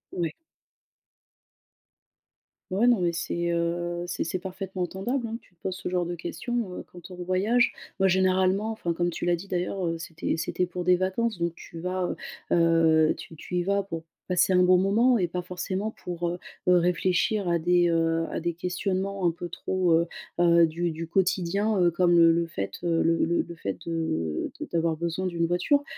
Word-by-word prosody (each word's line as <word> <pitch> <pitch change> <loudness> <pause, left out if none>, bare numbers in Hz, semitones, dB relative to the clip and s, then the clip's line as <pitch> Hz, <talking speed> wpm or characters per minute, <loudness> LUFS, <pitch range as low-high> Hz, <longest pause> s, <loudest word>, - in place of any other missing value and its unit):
Ouais. 170 -3 -1 2.4
Ouais, 215 +6 +3
non 235 -6 +4
mais 175 - +2
c'est, 170 +1 -2
heu, 175 +1 -1
c'est 175 - -2
c'est 180 +2 -3
parfaitement 190 0 -5
entendable 230 +8 -2
hein, 225 +1 -4
tu 185 - -27
te 170 - -37
poses 185 - -3
ce - - -5
genre 180 -1 0
de 175 0 -3
questions, 200 +4 -3
heu, - - -9
quand 175 +1 -12
on 180 - -7
voyage. 185 +7 +2 0.3
Moi 195 - +4
généralement 190 +3 +2
enfin 175 -6 -2
comme 175 +1 0
tu 170 - -4
l'as 175 0 +3
dit 180 +4 -9
d'ailleurs, 180 0 -2
heu, 165 0 -1
c'était 165 0 -3
c'était 175 +3 -1
pour 180 0 -5
des 180 0 +6
vacances 190 +4 -1
donc 170 0 0
tu 165 - -10
vas, 180 0 -2 0.4
heu - - +5 0.5
heu, - - +3
tu 160 - -10
tu 180 - -7
y 175 - +1
vas 200 +1 +1
pour 165 -4 -6 0.3
passer 180 +1 +3
un 180 0 +5
bon 180 0 +6
moment 225 +6 +4
et 180 -3 +1
pas 180 +1 -3
forcément 185 +4 -3
pour, 175 -3 -4
heu 175 - -4 0.3
heu, 180 - +7
réfléchir 180 +3 +1
à 170 -1 +2
des, 175 +1 +3
heu, 165 0 +1
à - - -2
des 170 +1 -1
questionnements 185 +2 -2
un 170 - +4
peu 175 +1 -7
trop, 185 0 0
heu 165 +1 +3 0.3
heu, 170 -1 +6
du 170 +1 -2
du 165 +1 -5
quotidien, 195 +3 +1
heu, 175 -1 +4
comme 175 0 +3
le 165 -1 +7
le 170 0 +1
fait, 100 -12 -4
heu, 165 -1 +2
le 165 0 +2
le 170 +1 +1
le 170 - -8
fait 100 -11 -4
de 160 - -2
de - - -4
d'avoir 165 -1 +1
besoin 170 +3 -2
d'une 170 -1 0
voiture. 280 - +2
175 Hz, 200 wpm, -27 LUFS, 170-190 Hz, 2.4 s, heu